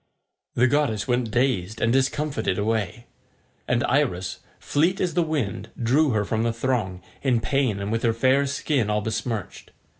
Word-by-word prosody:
The 120 - +4
goddess 130 -6 +1
went 125 -2 +1
dazed 115 -4 0
and 115 +1 +2
discomfited 135 -5 0
away, 110 +2 -1 0.6
and - - +1
Iris, 90 +1 0 0.2
fleet 170 +6 +1
as 180 - 0
the 175 - +2
wind, 120 - -2
drew 135 +6 +3
her 105 -4 +1
from 110 +2 -1
the 115 0 +1
throng, 115 -6 -2 0.2
in 130 -4 +2
pain 115 -1 0
and 100 +1 -3
with 115 0 0
her 115 - +3
fair 130 +4 +3
skin 140 -4 0
all 105 0 +1
besmirched. 110 -1 -4
115 Hz, 160 wpm, -24 LUFS, 105-135 Hz, 0.6 s, The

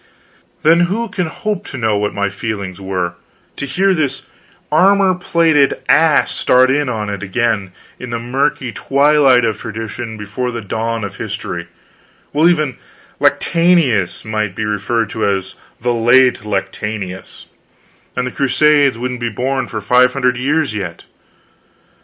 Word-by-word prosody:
Then 165 +2 +5
who 230 +3 -2
can 185 -4 -2
hope 210 +3 -4
to 140 - -7
know 110 -3 +1
what 105 0 0
my 100 0 -1
feelings 100 -3 -5
were, 90 -2 -2 0.4
to 140 - -5
hear 190 +8 +2
this 145 -6 -1 0.5
armor 190 +4 +4
plated 165 -5 +2
ass 160 -2 +4
start 130 +1 +3
in 145 -1 +1
on 110 -3 -3
it 100 -1 -4
again, 100 -1 -1 0.3
in 125 - -7
the 115 - -2
murky 130 +1 -1
twilight 140 -2 +3
of 110 -2 -1
tradition, 110 +1 -6
before 105 +5 -4
the 120 -1 -4
dawn 115 +2 -3
of 100 -1 -6
history, 85 -1 -5 0.6
while 155 +4 +4
even 155 -6 0 0.4
Lactantius 165 - +2
might 110 -3 -2
be 110 - -2
referred 105 +1 -1
to 110 - -3
as 95 -2 -1 0.3
"the 120 +1 0
late 120 +1 +4
Lactantius," 100 -1 -4 0.7
and 125 - -1
the 125 - -4
Crusades 140 0 +3
wouldn't 125 +1 -4
be 120 0 -2
born 130 +4 -2
for 110 - -5
five 125 +5 +4
hundred 125 -2 +1
years 145 +2 0
yet? 90 -5 -6
125 Hz, 145 wpm, -17 LUFS, 105-145 Hz, 0.7 s, Then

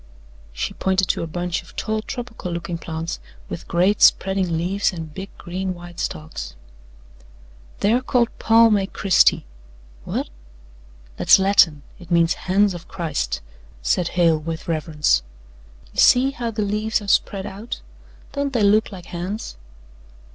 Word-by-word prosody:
She - - -3
pointed 190 0 +1
to - - +1
a 165 - -3
bunch 175 +2 -2
of - - -18
tall 220 0 -2
tropical 235 -6 -6
looking 170 0 -4
plants 165 0 -5 0.3
with - - -7
great 185 +5 +2
spreading 190 -3 +4
leaves 190 +5 0
and 160 -4 -7
big 195 +3 -7
green 185 +1 -4
white 175 0 -11
stalks. 150 - -5 1.3
"They're 225 +5 +3
called 245 -2 +2
Palmae 225 -3 +5
Christi." 195 - +3 0.6
"Whut?" - - -3 0.9
"That's - - +6
Latin. 190 -7 +4 0.2
It 175 -2 -13
means 170 -1 +3
'Hands 195 +1 +1
of 175 -1 -9
Christ,'" 150 - -3 0.4
said 170 - +1
Hale 165 -3 +4
with 160 +3 -6
reverence. 155 -2 +1 0.7
"You - - -5
see 260 +2 +6
how 245 -4 -4
the 215 -1 -2
leaves 215 +2 0
are - - -9
spread 195 0 +1
out 210 +5 -7 0.5
don't 280 -1 -2
they 230 -4 +2
look 210 +3 +3
like 180 -3 -9
hands?' 185 +5 -5
185 Hz, 140 wpm, -22 LUFS, 165-210 Hz, 1.3 s, That's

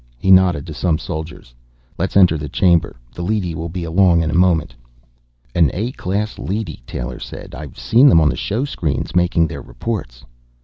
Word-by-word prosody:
He 95 +10 +1
nodded 90 -6 +4
to 80 - -7
some 80 0 0
soldiers. 80 -6 -7 0.5
"Let's - - 0
enter 90 -4 +6
the 75 -1 -5
chamber. 85 0 +2 0.2
The - - -7
leady 95 -2 -1
will 80 +1 -5
be 90 +1 -5
along 85 0 +3
in 80 - -1
a - - -3
moment." 90 -3 +2 0.8
"An 85 -5 +4
A 110 +7 -2
class 105 -2 -3
leady," 100 -4 -4
Taylor 60 0 -5
said. - - -9
"I've 70 +2 -9
seen 115 - +5
them 80 - +6
on 80 -2 +3
the - - -1
showscreens, 100 - -3
making 90 -2 +3
their 80 - -6
reports." - - -6
85 Hz, 180 wpm, -19 LUFS, 80-95 Hz, 0.8 s, enter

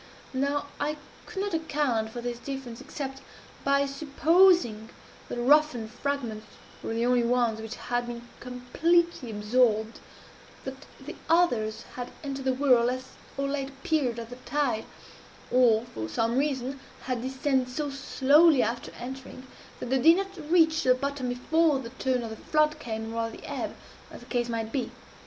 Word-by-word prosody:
Now 280 +2 0
I 300 +1 -1 0.3
could 390 -2 -3
not 405 -2 -3
account 290 -8 0
for 240 +2 -6
this 240 0 -4
difference 265 -3 -6
except 270 -1 -6 0.4
by 280 0 +3
supposing 290 - +3 0.4
that - - -3
the 240 - -2
roughened 260 -5 +3
fragments 245 -5 -3 0.3
were 225 - -3
the 230 +1 +1
only 250 0 +4
ones 235 -2 +1
which 225 +2 -6
had 245 0 -2
been 240 0 -7
completely 255 +4 +1
absorbed 220 +1 +1 0.6
that 265 +1 -8
the 295 +6 -8
others 240 -11 +2
had 245 -1 -4
entered 275 -2 -4
the 260 - +3
whirl 255 -3 +4
at 255 +1 -3 0.3
so 275 - 0
late 275 -1 -2
a 270 0 -13
period 275 -7 +1
of 230 0 -7
the 245 - -8
tide, 255 -3 -1 0.7
or, 235 -3 +4
from 110 0 -4
some 225 - 0
reason, 270 -1 -1 0.2
had 255 -2 -2
descended 260 0 0
so 290 +2 -3
slowly 280 +2 +4
after 235 +2 -3
entering, 260 +1 -8 0.3
that 245 - -5
they 265 - +3
did 330 +4 +7
not 385 -6 -5
reach 320 -2 +4
the 255 -1 +4
bottom 275 -1 -2
before 305 +5 +2
the 235 -3 -7
turn 260 -1 -1
of 225 - -5
the 220 - -7
flood 305 +3 +1
came, 225 -4 -5
or 230 0 -1
of 225 - -9
the - - -10
ebb, - - -4 0.3
as - - -11
the - - -13
case 240 -1 -1
might 225 -1 -2
be. 250 -3 -1
255 Hz, 170 wpm, -28 LUFS, 235-290 Hz, 0.7 s, did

